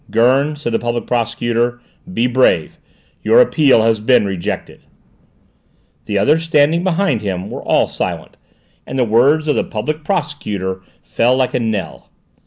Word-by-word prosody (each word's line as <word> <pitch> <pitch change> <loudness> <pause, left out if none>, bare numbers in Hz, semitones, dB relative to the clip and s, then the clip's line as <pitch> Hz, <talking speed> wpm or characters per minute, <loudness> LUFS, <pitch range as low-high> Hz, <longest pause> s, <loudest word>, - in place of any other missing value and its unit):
"Gurn," 130 +6 +2
said 145 -5 -4
the - - +1
Public 120 0 -3
Prosecutor. 120 0 -1 0.3
"Be 120 -9 0
brave! 125 +1 +1 0.4
Your 485 - +4
appeal 145 - +4
has 115 -1 +2
been 120 0 +3
rejected!" 95 -3 -5 1.2
The 105 - -2
others, 150 +11 +3
standing 165 +1 +2
behind 185 - 0
him, 95 -1 -4
were - - -6
all - - +2
silent, - - -5 0.5
and - - -5
the 130 - +3
words 135 +8 +2
of 150 - +2
the - - +1
Public 150 +8 -4
Prosecutor 105 - -3 0.2
fell 125 +2 +1
like 130 -1 0
a - - 0
knell. 110 -4 -4
125 Hz, 150 wpm, -17 LUFS, 110-150 Hz, 1.2 s, Your